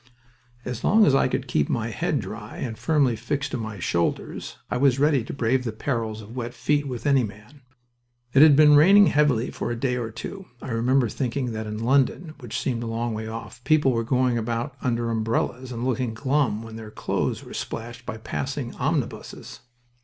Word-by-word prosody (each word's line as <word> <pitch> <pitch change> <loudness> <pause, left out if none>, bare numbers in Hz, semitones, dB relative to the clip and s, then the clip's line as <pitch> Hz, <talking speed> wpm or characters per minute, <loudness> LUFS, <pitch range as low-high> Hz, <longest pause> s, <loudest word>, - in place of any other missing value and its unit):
As 125 -1 -5
long 215 +2 +5
as 140 - +4
I 135 - +4
could - - -2
keep 75 - +1
my 115 -1 -1
head 155 +2 -1
dry 105 +2 -8
and 115 -3 -4
firmly 140 -3 +2
fixed 140 +5 -3
to - - -2
my 110 -3 -5
shoulders, 85 -1 -2
I - - +1
was 135 -1 +3
ready 145 -3 +3
to - - -7
brave 125 0 +1
the 115 - -2
perils 110 -2 -3
of 110 +4 -11
wet 120 -1 -4
feet 145 +4 0
with 125 -1 -5
any 140 -3 +4
man. 110 +7 -9 0.7
It 140 - +6
had 155 -2 +8
been 150 0 +7
raining 195 +7 +8
heavily 145 -8 +2
for - - -4
a 120 - -1
day 125 +1 -1
or 115 -2 -3
two. 190 - -8
I - - -7
remember 120 +2 +2
thinking 125 +2 -2
that 110 -1 -4
in 105 0 -4
London 135 +7 +1
which 120 -5 -4
seemed 120 -3 -2
a 120 - -4
long 115 +1 -2
way 110 0 -4
off 115 +2 -8
people 150 -3 +4
were 115 -1 0
going 125 0 +1
about 120 +4 -2
under 120 -3 0
umbrellas 115 +3 -1
and 120 0 -3
looking 125 -3 -1
glum 130 -3 0
when 115 -1 -9
their 110 -1 -8
clothes - - -2
were - - -11
splashed 120 +2 -6
by 125 -2 -6
passing 130 +2 -4
omnibuses. 140 -1 -3
125 Hz, 200 wpm, -25 LUFS, 115-140 Hz, 0.7 s, had